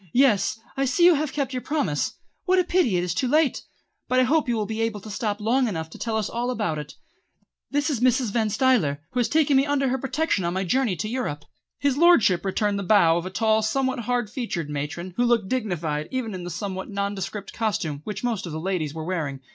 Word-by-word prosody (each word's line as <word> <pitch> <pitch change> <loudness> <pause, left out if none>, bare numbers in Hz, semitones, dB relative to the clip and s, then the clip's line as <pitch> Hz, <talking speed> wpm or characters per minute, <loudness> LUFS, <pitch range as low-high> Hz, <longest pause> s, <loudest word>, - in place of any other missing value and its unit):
"Yes, 235 -4 +3 0.2
I 275 - +1
see 270 +7 +3
you 355 - +8
have 305 -2 -1
kept 275 -2 -2
your 255 - -2
promise. 275 - -1 0.3
What 370 0 +3
a 365 - +4
pity 345 - +2
it 175 - 0
is 180 -2 -1
too 255 +8 0
late! 300 +1 +2 0.5
But 255 - +2
I - - +5
hope 290 +1 +2
you 240 - +2
will 215 -2 -1
be 220 +2 -3
able 225 -2 -1
to 215 +2 -9
stop 210 -1 -2
long 245 +4 +2
enough 160 -6 -4
to - - -11
tell 225 -1 -1
us 215 - -1
all 240 +1 -2
about 210 -11 -1
it. 150 0 -8 0.7
This 290 +2 0
is 265 - -1
Mrs. 250 -2 +2
Van 220 -1 +1
Stuyler, 210 - +2
who 250 - -1
has 240 - +1
taken 305 -2 +3
me 270 +2 +4
under 275 -2 +1
her 260 +1 -1
protection 270 - 0
on 170 +1 -1
my 190 - 0
journey 230 +2 +1
to 170 +6 -3
Europe." 215 - -3 0.3
His 280 -1 0
lordship 235 - +5
returned 200 +1 0
the - - -3
bow 175 -5 +5
of 175 +1 -3
a - - -4
tall, 220 +2 +2
somewhat 260 +4 0
hard 245 -1 -1
featured 185 - -3
matron 150 +5 -4
who 245 - +3
looked 235 -5 +2
dignified 170 -11 -2
even 250 -5 -3
in 180 -2 -6
the - - -4
somewhat 190 +1 -5
nondescript 200 0 -4
costume 170 -10 -2
which 210 +6 -5
most 230 -7 -1
of - - -6
the 155 - -4
ladies 165 -4 -2
were 160 -1 -5
wearing. 155 -7 -3
220 Hz, 235 wpm, -24 LUFS, 180-260 Hz, 0.7 s, you